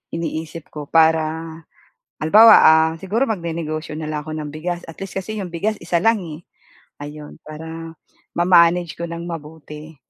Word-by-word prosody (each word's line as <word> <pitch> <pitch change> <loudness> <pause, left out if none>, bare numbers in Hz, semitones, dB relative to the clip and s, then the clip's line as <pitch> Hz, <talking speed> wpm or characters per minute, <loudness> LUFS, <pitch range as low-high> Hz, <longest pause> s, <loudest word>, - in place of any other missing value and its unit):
iniisip 160 -1 -5
ko 150 -2 -8
para 160 0 +2 0.6
halimbawa, 215 +8 +8
ah, 160 0 +5
siguro 210 +7 0
magnenegosyo 165 - -4
na 155 - -5
lang 150 -1 -3
ako 155 - -9
ng 150 -1 -5
bigas 175 +2 -4
at 165 - -12
least 195 -1 -7
kasi 215 +3 -5
'yong 185 -3 -6
bigas 200 +6 -1
isa 170 0 0
lang, 225 +4 +2
eh, 160 -2 -8 0.6
ayun. 150 +1 -10
Para 160 +1 -9 0.4
ma-manage 175 -1 +4
ko 170 - -4
ng 170 0 -6
mabuti, 155 -1 -9
165 Hz, 155 wpm, -20 LUFS, 155-175 Hz, 0.6 s, halimbawa